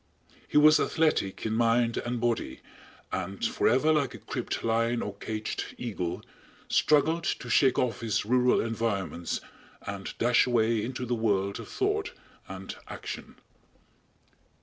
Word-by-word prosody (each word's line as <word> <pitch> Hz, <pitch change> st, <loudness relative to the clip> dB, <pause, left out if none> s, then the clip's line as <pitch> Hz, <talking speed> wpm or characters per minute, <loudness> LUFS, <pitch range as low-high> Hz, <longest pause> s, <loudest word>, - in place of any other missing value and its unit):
He -, -, +1 dB
was 155 Hz, +1 st, +7 dB
athletic 155 Hz, -13 st, +1 dB
in 110 Hz, -, 0 dB
mind 115 Hz, +1 st, +2 dB
and 120 Hz, 0 st, -2 dB
body, 120 Hz, -1 st, -1 dB, 0.5 s
and 95 Hz, +1 st, -3 dB
forever 135 Hz, +7 st, +3 dB
like 145 Hz, -4 st, 0 dB
a -, -, -7 dB
cribbed -, -, -4 dB
lion 115 Hz, +1 st, +1 dB
or 100 Hz, -, -4 dB
caged 110 Hz, +1 st, -4 dB
eagle, 100 Hz, -8 st, -4 dB, 0.4 s
struggled 160 Hz, +3 st, +3 dB
to -, -, -2 dB
shake 130 Hz, -3 st, +4 dB
off 125 Hz, -3 st, 0 dB
his 110 Hz, -2 st, 0 dB
rural 125 Hz, +2 st, +3 dB
environments 100 Hz, -7 st, -2 dB, 0.4 s
and 100 Hz, -1 st, -5 dB
dash 120 Hz, +1 st, +3 dB
away 115 Hz, -2 st, +2 dB
into 125 Hz, +2 st, -4 dB
the 120 Hz, -, -1 dB
world 100 Hz, -4 st, 0 dB
of -, -, -8 dB
thought 410 Hz, +1 st, -1 dB, 0.4 s
and -, -, -7 dB
action. -, -, -7 dB
115 Hz, 135 wpm, -28 LUFS, 110-130 Hz, 0.5 s, was